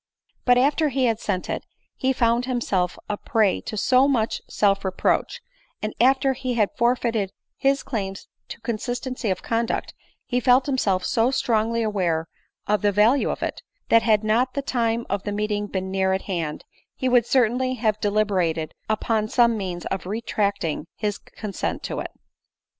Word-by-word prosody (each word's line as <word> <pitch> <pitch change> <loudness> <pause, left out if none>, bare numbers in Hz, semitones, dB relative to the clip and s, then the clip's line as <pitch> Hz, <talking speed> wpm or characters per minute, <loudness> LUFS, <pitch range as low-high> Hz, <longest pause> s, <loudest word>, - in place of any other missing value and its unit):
But 245 -1 +5
after 295 +4 +3
he 265 -1 +1
had 225 -2 +1
sent 185 -5 -2
it, - - -3 0.3
he 265 - +1
found 235 -1 +2
himself 205 -8 -1
a 210 - -2
prey 220 -6 +1
to 215 - -6
so 255 +5 +4
much 230 -6 0
self 200 -1 +2
reproach, 190 -1 0 0.4
and 215 - -3
after 265 +2 +4
he 255 -1 -3
had 210 -3 +1
forfeited 235 -4 +1 0.2
his 275 +1 +1
claims 195 -5 -4 0.2
to - - -8
consistency 245 +1 -3
of 185 - -2
conduct, 230 0 -1 0.3
he 250 - 0
felt 255 +1 +4
himself 200 -10 0
so 235 -1 +2
strong 225 -4 +1
ly 230 0 0
aware 180 -7 0 0.4
of 210 0 +1
the 205 -1 +3
value 215 +7 +3
of - - -3
it, - - -3 0.3
that 230 - +6
had 220 -2 +3
not 235 +4 +1
the 280 - -1
time 235 -3 0
of 200 0 -1
the 205 - -4
meeting 210 0 -1
been 190 -1 -3
near 190 0 +1
at 190 - -1
hand, 165 -6 -3 0.3
he 260 - -2
would 245 -2 +4
certainly 255 +1 +2
have 215 -3 0
deliberated 185 -7 0 0.2
upon 215 0 0
some 235 0 +3
means 185 -4 -4
of 190 -2 -3
retracting 200 -6 -1
his 210 -2 -2
consent 210 -3 -5
to - - -3
it. - - -4
220 Hz, 170 wpm, -24 LUFS, 200-245 Hz, 0.4 s, that